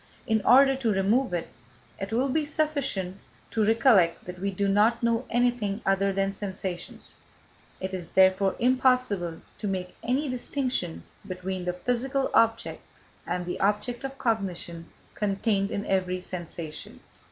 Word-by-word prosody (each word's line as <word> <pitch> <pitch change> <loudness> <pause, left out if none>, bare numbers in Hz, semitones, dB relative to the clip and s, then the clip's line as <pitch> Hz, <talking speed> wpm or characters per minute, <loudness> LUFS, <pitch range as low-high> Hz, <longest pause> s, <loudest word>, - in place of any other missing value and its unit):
In 220 -2 +2
order 270 +1 +6
to 240 -5 +1
remove 205 +5 +2
it, 175 -2 -2 0.5
it 195 +2 -4
will 250 +4 +1
be 310 +4 +1
sufficient 285 - -1 0.3
to 220 - +1
recollect 220 -6 +4
that 180 0 -8
we 200 +2 -1
do 200 +1 -1
not 215 +4 +3
know 235 +2 +1
anything 240 -4 +1
other 195 0 +2
than 195 0 0
sensations; 190 -3 -6 0.6
it 190 0 -4
is 180 -3 -4
therefore 190 +1 +4
impossible 250 -9 +2 0.2
to 210 - -3
make 185 -2 -3
any 260 +6 0
distinction 255 - -2 0.2
between 185 0 -4
the 180 - 0
physical 250 +7 -1
object 225 0 +2 0.5
and 180 -1 -2
the 175 - -4
object 210 +5 0
of 270 0 -5
cognition 180 -8 -2 0.3
contained 200 -1 0
in 200 0 -3
every 185 -1 0
sensation. 170 -3 -7
200 Hz, 140 wpm, -27 LUFS, 185-245 Hz, 0.6 s, order